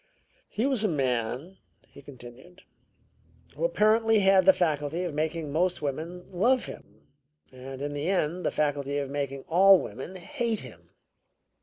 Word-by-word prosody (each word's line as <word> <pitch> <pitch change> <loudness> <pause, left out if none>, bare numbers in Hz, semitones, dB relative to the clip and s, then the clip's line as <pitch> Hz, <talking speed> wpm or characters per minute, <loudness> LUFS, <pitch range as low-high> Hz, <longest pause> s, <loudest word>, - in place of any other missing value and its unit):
"He 225 - -1
was 265 -6 +1
a - - +3
man," 130 - -2 0.3
he 140 - -15
continued, 130 +6 -14 0.9
"who - - -5
apparently 225 - +3
had 190 -1 +4
the - - +11
faculty 160 -1 -1
of 175 -4 -4
making 155 0 -2
most 175 +1 0
women 160 +6 -4
love 235 +8 +2
him 105 +2 -12 0.5
and, 130 +1 -8
in 145 0 -3
the 145 +4 -2
end, 180 -1 0
the - - +1
faculty 145 -1 -1
of 140 -1 -3
making 140 -1 -4
all 190 +3 +6
women 190 - -7
hate 230 +2 -3
him. - - -13
165 Hz, 150 wpm, -27 LUFS, 140-190 Hz, 0.9 s, the